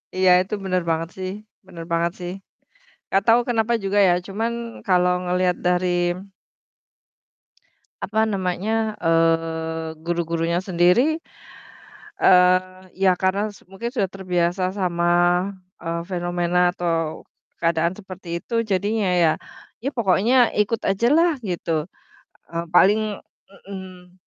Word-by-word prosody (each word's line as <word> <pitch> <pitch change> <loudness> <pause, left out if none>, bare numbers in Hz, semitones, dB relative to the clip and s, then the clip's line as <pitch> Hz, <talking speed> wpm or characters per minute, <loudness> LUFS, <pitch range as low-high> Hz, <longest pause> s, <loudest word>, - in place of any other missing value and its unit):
Iya, 185 0 +3
itu 190 +3 -6
bener 185 -1 0
banget 165 +1 -1
sih 185 0 -4 0.4
bener 170 -3 -9
banget 170 +1 +1
sih. 175 0 -5 0.8
Gak 195 - +3
tahu 230 +1 +6
kenapa 230 -1 +1
juga 200 +1 +1
ya 175 - +5
cuman 220 +4 -2 0.3
kalau 180 -2 +3
ngelihat 180 0 +1
dari 180 0 +2 2.2
apa 220 +2 +1
namanya, 210 +3 -1
eee, 165 -1 0
guru-gurunya 170 0 -1
sendiri, 190 - +3 1.1
eee, 185 0 +4
ya 190 0 +3
karena 200 +3 0
s 190 - -19
mungkin 210 +5 -6
sudah 210 -7 0
terbiasa 185 -1 -1
sama, 175 -1 +2 0.4
eee, 170 0 -2
fenomena 175 0 +1
atau 165 -3 -2 0.3
keadaan 165 0 +1
seperti 185 -3 -6
itu 230 +4 -1
jadinya 205 -1 0
ya, 160 - +5 0.5
ya 270 - 0
pokoknya 235 +1 +3
ikut 210 +2 0
ajalah 290 - +3
gitu, 165 -4 -2 0.7
eee, 170 0 -2
paling 205 +4 +3 0.5
mhm, 185 -2 -10
185 Hz, 115 wpm, -22 LUFS, 170-205 Hz, 2.2 s, tahu